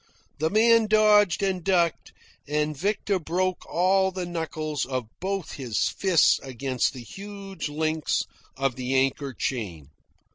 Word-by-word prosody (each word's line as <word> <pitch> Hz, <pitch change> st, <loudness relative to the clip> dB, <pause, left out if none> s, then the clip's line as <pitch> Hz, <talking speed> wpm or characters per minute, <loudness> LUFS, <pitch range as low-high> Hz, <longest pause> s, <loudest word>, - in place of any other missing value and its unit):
The 160 Hz, +1 st, +1 dB
man 225 Hz, +2 st, +4 dB
dodged 210 Hz, -3 st, +4 dB
and 190 Hz, -3 st, 0 dB
ducked, 175 Hz, -3 st, +1 dB, 0.4 s
and 150 Hz, +1 st, 0 dB
Victor 200 Hz, +4 st, 0 dB
broke 180 Hz, +3 st, -2 dB
all 190 Hz, +2 st, +3 dB
the 185 Hz, -1 st, -4 dB
knuckles 155 Hz, -3 st, -3 dB
of 130 Hz, -2 st, -3 dB
both 195 Hz, -2 st, -3 dB
his 125 Hz, -6 st, -1 dB
fists 185 Hz, -5 st, +3 dB
against 130 Hz, -1 st, -2 dB
the 125 Hz, -2 st, -8 dB
huge 195 Hz, -, -7 dB
links 155 Hz, +1 st, 0 dB, 0.3 s
of 135 Hz, -2 st, 0 dB
the 130 Hz, +1 st, -2 dB
anchor 135 Hz, +1 st, +1 dB
chain. 95 Hz, -, -4 dB
160 Hz, 135 wpm, -26 LUFS, 135-195 Hz, 0.4 s, man